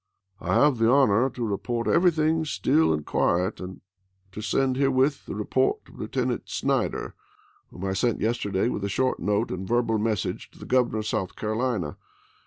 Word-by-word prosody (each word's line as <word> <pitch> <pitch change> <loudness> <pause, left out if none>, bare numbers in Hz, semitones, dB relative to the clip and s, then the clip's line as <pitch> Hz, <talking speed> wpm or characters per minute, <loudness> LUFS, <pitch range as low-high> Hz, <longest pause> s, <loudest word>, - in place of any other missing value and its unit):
I - - -1
have 145 -5 +4
the 115 0 +4
honor 130 -2 +4
to 120 -2 -4
report 115 +3 -2
everything 160 -2 +3
still 155 +1 +2
and 75 -2 -1
quiet, 90 +4 0
and 95 0 -8 0.5
to 105 - -7
send 130 +5 +1
herewith 135 +1 +1
the - - -5
report 415 +2 +1
of - - -17
Lieutenant - - -2
Snyder, - - -1 0.6
whom - - -7
I 95 - -1
sent 115 +4 0
yesterday 105 -3 0
with 105 - -3
a 100 - -1
short 130 +6 0
note 105 +2 0
and 95 +1 -4
verbal 115 -1 +1
mes 110 -1 0
sage - - -5
to - - -21
the - - -10
Governor 125 -3 +2
of 110 - -3
South 100 -4 -2
Carohna. 110 - -2
115 Hz, 180 wpm, -26 LUFS, 100-130 Hz, 0.6 s, have